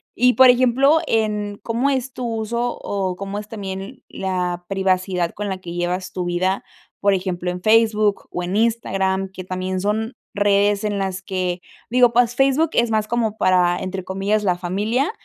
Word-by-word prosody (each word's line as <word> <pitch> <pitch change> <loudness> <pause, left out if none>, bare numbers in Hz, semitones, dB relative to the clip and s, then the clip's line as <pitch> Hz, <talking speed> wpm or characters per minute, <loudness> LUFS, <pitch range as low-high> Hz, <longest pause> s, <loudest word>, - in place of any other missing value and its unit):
Y, 250 +1 +4
por 260 0 +7
ejemplo, 255 +4 +4
en 210 -2 -1
cómo 235 +4 0
es 265 -1 -1
tu 255 -2 -5
uso 235 +2 -2
o 190 -2 -2
cómo 200 +2 -5
es 210 - -9
también 200 +2 -7
la 180 -2 -3
privacidad 185 -2 0
con 205 0 -4
la 190 -1 -3
que 175 - -8
llevas 175 +1 -2
tu 180 -1 -3
vida, 185 +2 0 0.4
por 200 0 +3
ejemplo, 180 -2 -2
en 180 0 -6
Facebook 215 -1 +3
o 180 - -3
en 180 +3 -2
Instagram, 195 -4 0
que 185 -1 -8
también 185 0 -3
son 215 +5 -1 0.2
redes 205 0 +2
en 210 -1 -1
las 190 -1 -2
que 185 -2 -2 0.3
digo, 245 0 +5
pues 245 0 +2
Facebook 275 +5 +3
es 235 -1 +2
más 215 -1 +1
como 225 -2 -1
para, 180 -2 +3
entre 190 0 -4
comillas, 195 +3 -1
la 180 -3 +1
familia 210 - -1
200 Hz, 175 wpm, -21 LUFS, 185-225 Hz, 0.4 s, por